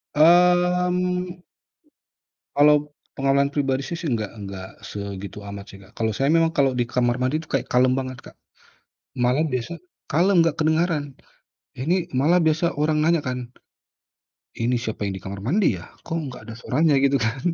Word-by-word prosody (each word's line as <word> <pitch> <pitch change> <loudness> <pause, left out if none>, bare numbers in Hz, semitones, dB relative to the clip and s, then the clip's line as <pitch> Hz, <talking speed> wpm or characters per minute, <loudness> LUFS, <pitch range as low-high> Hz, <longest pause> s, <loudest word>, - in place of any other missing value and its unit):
Mmm. 180 +2 +3 1.1
Kalau 150 0 +4 0.2
pengalaman 135 +1 +2
pribadi 135 -2 0
sih 170 - -4
sih 165 -5 -3
enggak 110 -3 -2 0.2
nggak 95 -1 -7 0.2
segitu 100 0 -7
amat 100 0 -7
sih, 100 - -12
Kak. 100 +2 -17
Kalau 110 -1 0
saya 135 +6 0
memang 165 0 +3
kalau 140 -4 +2
di 120 - +1
kamar 120 0 0
mandi 130 +5 0
itu 160 - -11
kayak 135 - -1
kalem 125 +1 +4
banget, 130 -1 -4
Kak, - - -14 0.8
malah 125 +5 +2
biasa 135 +6 -4 0.3
kalem 175 +3 +4
nggak 165 -2 0
kedengeran. 160 -1 +1 0.7
Ini 170 +6 -1
malah 160 +7 +4
biasa 160 +2 +1
orang 150 +1 +1
nanya 165 -1 +3
kan, 125 -2 -4 1.1
"ini 120 +2 +1
siapa 110 -3 -4
yang 95 - -3
di - - -19
kamar 95 0 -6
mandi 180 - +2
ya? - - -11 0.2
Kok 165 - -2
nggak 125 - -10
ada - - -7
suaranya?" 150 +5 +2
Gitu, 140 0 +3
kan. 120 +4 -1
140 Hz, 165 wpm, -23 LUFS, 120-165 Hz, 1.1 s, Kalau